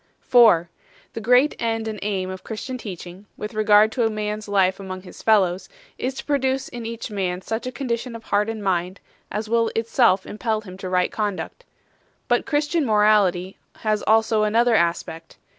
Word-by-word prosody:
4. 220 -9 +5 0.5
The 225 - -5
great 250 +6 +4
end 225 -1 -1
and 215 -2 -5
aim 190 -2 -2
of 185 - -8
Christian 235 +4 -6
teaching, 185 -1 -9
with 210 - -6
regard 215 0 +5
to 230 -2 +1
man 210 0 -3
s 215 - -11
life 190 -2 +2
among 185 -1 -7
his 185 - -12
fellows, 195 -4 +2 0.3
is 260 +1 -2
to - - -7
produce 270 -2 0
in 240 -2 -6
each 230 -1 -6
man 185 -2 -2
such 225 +3 -4
a - - -3
condition 240 -1 -3
of 225 - -9
heart 210 0 0
and 220 -2 -5
mind 185 0 -1 0.3
as 215 +1 -4
will 230 +1 +2
of - - -5
itself 225 -4 +2
impel 215 0 -2
him 185 -4 -11
to 185 - -5
right 180 0 +1
conduct. 210 - -4 0.6
But - - +1
Christian 300 +2 +1
morality 210 -5 +2 0.2
has 215 -1 -1
also 220 0 +3
another 230 +3 +3
aspect. 170 -3 -1
215 Hz, 180 wpm, -23 LUFS, 190-230 Hz, 0.6 s, 4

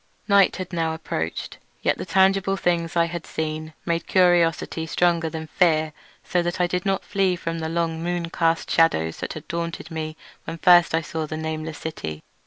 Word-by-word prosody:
Night 200 -2 +5
had 185 -1 -6
now 165 -1 0
approached, 80 - -4 0.2
yet - - +1
the - - -5
tangible 195 0 +3
things 170 -2 0
I 170 -1 +4
had 170 -1 -6
seen 155 0 -4
made 170 0 -1
curiosity 170 -3 +2
stronger 170 -1 +2
than 160 0 -5
fear, 155 -2 +2 0.3
so 180 - +1
that 175 +1 -2
I 180 - +4
did 180 +3 -2
not 195 -1 0
flee 195 -3 +1
from 165 -1 -4
the 160 0 -3
long 165 -1 -1
moon 170 -1 -2
cast 165 -1 0
shadows 80 - +2
that - - -4
had 155 0 -9
daunted 170 0 -4
me 155 -1 -4 0.3
when 165 - -5
first 175 -1 +6
I 165 - +2
saw 160 0 -4
the 155 - -4
nameless 160 0 -4
city. 80 - -6
165 Hz, 190 wpm, -24 LUFS, 160-175 Hz, 0.3 s, first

